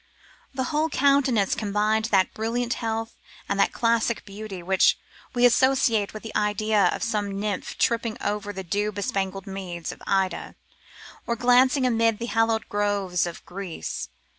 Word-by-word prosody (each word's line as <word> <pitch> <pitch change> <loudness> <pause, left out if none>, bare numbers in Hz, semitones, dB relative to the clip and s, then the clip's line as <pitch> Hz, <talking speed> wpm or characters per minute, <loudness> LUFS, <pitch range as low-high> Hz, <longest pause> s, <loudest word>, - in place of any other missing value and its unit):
The 260 - 0
whole 310 +2 +2
countenance 275 -8 +3
combined 215 0 0
that 195 -5 +2
brilliant 235 +2 -1
health 225 0 -3 0.3
and 200 0 -1
that - - +3
classic 230 -1 +1
beauty 200 -2 -8
which 190 +1 +4 0.4
we 245 0 +4
associate 245 -4 +3
with 215 - -9
the 225 - -8
idea 210 -1 +2
of - - -2
some 205 -3 -2
nymph 205 -2 -3
tripping 230 -1 0
over 205 0 -2
the 190 -1 -6
dew 205 +4 -1
bespangled 195 -2 -3
meads 185 -3 -5
of - - -12
Ida, 190 -1 0 0.7
or 235 - 0
glancing 255 +3 +4
amid 230 -2 +2
the 235 - -4
hallowed 225 0 +1
groves 200 -4 0
of 170 - -8
Greece. 180 - -5
215 Hz, 150 wpm, -25 LUFS, 195-235 Hz, 0.7 s, which